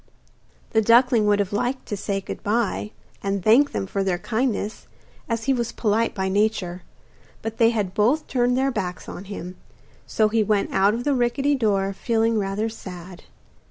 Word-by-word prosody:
The 220 - +3
duckling 230 0 +4
would 205 0 +4
have 205 -1 -1
liked 245 +5 -1
to 205 - -4
say 195 0 -2
good - - -7
bye, 210 -1 -1 0.3
and 195 -2 -2
thank 255 +7 +5
them - - -2
for 195 +1 -2
their 185 -2 0
kindness, 220 +2 -2 0.4
as 230 -1 -1
he 270 - +2
was 235 -2 -2
polite 225 +1 0
by 190 -1 -1
nature; 190 -3 0 0.6
but 225 0 -4
they 230 -1 +6
had 210 -5 -1
both 235 +9 +2
turned 245 -1 +1
their 270 +1 +2
backs 180 -7 -4
on 185 - -8
him, 185 -2 -7 0.5
so 215 - +2
he 220 +1 +1
went 210 -1 +1
out 200 +3 +3
of 240 - -4
the 290 - +1
rickety 270 +3 +1
door 200 -6 +1
feeling 225 +2 +1
rather 200 +2 -1
sad. 180 -5 -9
215 Hz, 180 wpm, -23 LUFS, 195-235 Hz, 0.6 s, they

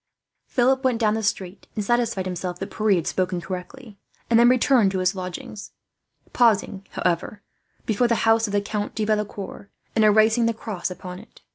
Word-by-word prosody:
Philip 260 +2 +2
went 250 -3 +1
down 215 -2 +2
the 220 - -1
street, 195 -2 -3
and 210 -2 -2
satisfied 235 -5 0
himself 180 -1 -4
that 195 - -6
Pierre 215 -2 +3
had 170 -3 -1
spoken 185 -1 -1
correctly; 195 +5 -8 0.3
and 230 - +6
then 240 +1 +7
returned 250 -4 +4
to - - -1
his 185 +1 +1
lodgings, 185 +2 -7 0.6
pausing, 205 -4 +2
however, 180 +4 -2 0.4
before 230 +3 +2
the 235 - +2
house 225 0 +4
of 205 - -6
the 205 - +2
Count 205 0 -4
de 215 - -1
Valecourt, 210 -2 -3 0.3
and 220 - +3
erasing 220 +2 +4
the 230 - 0
cross 210 -6 -4
upon 180 0 -8
it. - - -17
210 Hz, 180 wpm, -23 LUFS, 185-230 Hz, 0.6 s, then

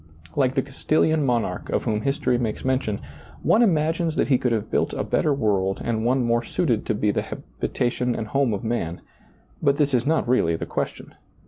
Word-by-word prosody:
Like 135 -2 +2
the 135 - +2
Castilian 155 +3 +1
monarch 120 -4 -1
of - - 0
whom 105 -1 0
history 135 -1 +1
makes 115 -1 -3
mention, 130 -6 0 0.4
one 225 - +4
imagines 165 -4 +2
that - - +1
he 130 -3 +4
could 125 - 0
have 110 -1 -2
built - - +1
a - - -1
better 150 - +1
world 100 -7 +1
and 110 -2 -1
one 125 +2 +2
more 120 0 +1
suited 120 -6 0
to 110 - +1
be 105 0 +1
the - - 0
habi - - -8 0.2
tation 125 0 0
and 110 - -3
home 135 -2 +2
of 100 - -3
man; 110 -8 -2 0.6
but 140 0 +3
this 145 -2 +1
is 125 +1 +2
not 160 -5 +2
realty 100 -10 +2
the - - -4
question. - - -4
125 Hz, 205 wpm, -24 LUFS, 110-140 Hz, 0.6 s, one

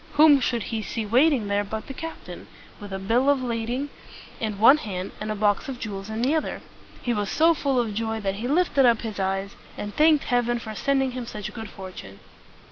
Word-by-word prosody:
Whom 295 -1 +7
should 240 -3 -1
he 220 - -1
see 220 +1 -4
waiting 250 +1 +3
there 200 0 +1
but 215 +2 -5
the 270 - -7
captain, 325 +4 -8 0.3
with 205 -2 -9
a 195 - -3
bill 230 +8 +2
of 275 -2 +2
lading 240 +4 -2 0.5
in 215 -3 -3
one 235 +8 +7
hand 190 -9 -5
and 215 - -3
a - - -2
box 205 +6 +1
of 265 - -5
jewels 200 -3 -6
in 220 +2 -3
the 270 +4 +2
other? 315 - -2 0.4
He 240 - 0
was 205 -3 -1
so 330 +2 +4
full 275 -4 0
of 225 -3 -1
joy 220 +1 -2
that 195 -1 -2
he 230 +4 -3
lifted 295 -1 +3
up 235 -2 +3
his 220 -3 -5
eyes, 195 +1 -2 0.2
and 205 0 -6
thanked 310 -1 +5
Heaven 240 -1 +1
for 220 -2 -7
sending 270 +2 +1
him 250 -1 -6
such 210 -3 -6
good 225 -2 -7
fortune. 185 - -10
230 Hz, 215 wpm, -25 LUFS, 205-270 Hz, 0.5 s, Whom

